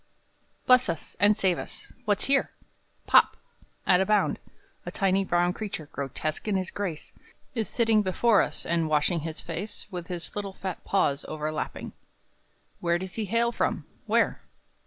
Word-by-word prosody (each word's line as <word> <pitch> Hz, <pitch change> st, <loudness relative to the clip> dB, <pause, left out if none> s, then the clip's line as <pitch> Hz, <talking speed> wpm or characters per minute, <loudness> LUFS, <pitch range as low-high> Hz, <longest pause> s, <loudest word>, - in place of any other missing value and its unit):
I. -, -, -42 dB, 0.2 s
Bless 250 Hz, -4 st, +5 dB
us, 165 Hz, -2 st, -4 dB
and 205 Hz, +1 st, +5 dB
save 185 Hz, -3 st, +2 dB
us! -, -, -9 dB
What's 205 Hz, -2 st, +2 dB
here? 275 Hz, 0 st, +3 dB, 0.6 s
Pop! -, -, +5 dB, 0.5 s
At 180 Hz, 0 st, +5 dB
a -, -, +2 dB
bound, 210 Hz, -1 st, +2 dB, 0.4 s
A -, -, -5 dB
tiny 195 Hz, -1 st, +1 dB
brown 175 Hz, -1 st, +2 dB
creature, 190 Hz, -9 st, -6 dB
grotesque 145 Hz, -, -3 dB
in 210 Hz, -, +1 dB
his 185 Hz, -1 st, -1 dB
grace, 180 Hz, -7 st, -4 dB, 0.4 s
Is 225 Hz, -4 st, -2 dB
sitting 225 Hz, -2 st, +3 dB
before 205 Hz, +3 st, +3 dB
us, -, -, -1 dB
and 165 Hz, -2 st, 0 dB
washing 155 Hz, +3 st, +2 dB
his 160 Hz, 0 st, -5 dB
face 200 Hz, +6 st, -5 dB
With 175 Hz, -2 st, -5 dB
his 175 Hz, -2 st, -4 dB
little 200 Hz, -2 st, -4 dB
fat 190 Hz, -2 st, -6 dB
paws 145 Hz, -8 st, +1 dB
overlapping; 155 Hz, 0 st, -4 dB, 0.9 s
Where 170 Hz, 0 st, +1 dB
does 185 Hz, +1 st, -6 dB
he 220 Hz, 0 st, -2 dB
hail 230 Hz, +4 st, +1 dB
from? -, -, -1 dB, 0.2 s
Where? -, -, +2 dB
190 Hz, 160 wpm, -27 LUFS, 170-210 Hz, 0.9 s, Bless